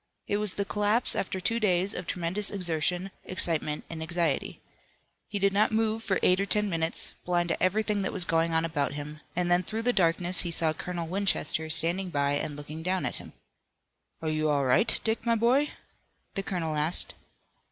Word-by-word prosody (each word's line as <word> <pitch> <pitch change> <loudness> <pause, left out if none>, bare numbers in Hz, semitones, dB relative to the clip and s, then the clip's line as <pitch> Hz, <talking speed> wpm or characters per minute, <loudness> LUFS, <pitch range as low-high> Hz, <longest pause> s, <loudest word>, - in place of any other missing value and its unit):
It 205 - 0
was 210 -2 +2
the 200 - -1
collapse 210 +4 +1
after 190 0 -2
two 225 +5 0
days 190 -1 +2
of 180 - -6
tremendous 185 +4 0
exertion, 180 0 -1
excitement 160 -4 0
and 165 -1 -7
anxiety. 165 -3 -1 0.7
He 205 - -3
did 200 0 +2
not 210 +2 +3
move 220 0 +1
for 190 -3 +1
eight 180 +1 +4
or 200 - -1
ten 210 0 +1
minutes, 165 0 0
blind 175 -1 0
to - - -1
everything 210 +2 +1
that 190 - -1
was 185 -3 -3
going 165 0 +1
on 160 0 +2
about 145 -4 -1
him, 150 +1 -7
and 175 0 0
then 175 0 +5
through 220 +5 -4
the 245 +1 +3
darkness 180 -1 +3
he 175 - +2
saw 165 -1 0
Colonel 170 +1 -4
Winchester 170 -4 -1
standing 170 +4 +2
by 140 -3 +1
and 145 +1 -1
looking 150 +2 -7
down 185 +2 -1
at - - -3
him. - - -11 0.9
"Are 160 - 0
you 155 0 0
all 140 -2 +2
right, 175 - +3
Dick, 220 0 -1
my 230 -1 +2
boy?" 250 +6 +3 0.6
the 195 - -2
colonel 170 -5 -2
asked. 150 +3 +2
180 Hz, 195 wpm, -28 LUFS, 160-200 Hz, 0.9 s, then